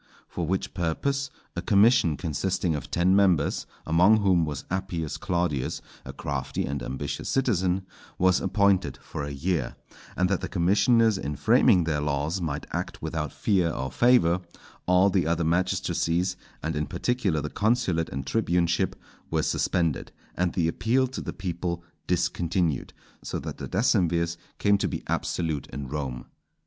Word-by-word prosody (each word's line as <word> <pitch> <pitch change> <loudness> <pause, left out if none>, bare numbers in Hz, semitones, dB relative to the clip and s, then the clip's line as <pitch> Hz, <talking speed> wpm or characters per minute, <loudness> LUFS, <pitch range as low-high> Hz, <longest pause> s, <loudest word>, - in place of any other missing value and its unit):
For 85 -2 -4
which 95 +2 -1
purpose 135 +12 -1 0.3
a - - -2
commission 100 - +4
consisting 90 +1 -1
of 75 -4 -4
ten 90 +2 +3
members, 95 -7 +2 0.2
among 90 +7 +5
whom 90 -4 +3
was 75 -2 -5
Appius 85 -5 -2
Claudius, 85 -7 -1 0.2
a - - -7
crafty 65 -2 -3
and 70 0 -3
ambitious 65 - -4
citizen, 95 -8 +1 0.3
was 90 0 +3
appointed 95 -1 +2
for - - -6
a 70 - -4
year; 70 -2 -2 0.4
and 90 - +3
that 95 -1 0
the 95 - -4
commissioners 100 +4 +3
in 75 -3 -3
framing 110 - +4
their 75 -3 -1
laws 75 +5 -1
might 75 -4 -3
act - - -4
without 75 -2 -2
fear 95 -5 +1
or 65 -4 -3
favour, 90 - +4 0.5
all 90 +2 +5
the 95 -4 +1
other 85 +1 +1
magistracies, 90 +1 0 0.3
and 80 0 -2
in 75 -1 -1
particular 100 - 0
the 75 +1 -4
consulate 105 -7 +1
and 70 -1 -5
tribuneship, 90 -1 +1 0.3
were - - 0
suspended, 85 -5 0 0.2
and 90 -1 0
the 85 -3 +1
appeal 120 +10 +2
to 130 0 -6
the - - -4
people 85 -2 -4 0.2
discontinued; 85 -3 0 0.3
so - - -4
that - - -6
the - - -5
decemvirs 85 -5 +2 0.2
came 100 0 +3
to - - +1
be - - -4
absolute 80 -4 -2
in 70 +2 -6
Rome. 65 -3 -4
90 Hz, 155 wpm, -26 LUFS, 80-95 Hz, 0.5 s, among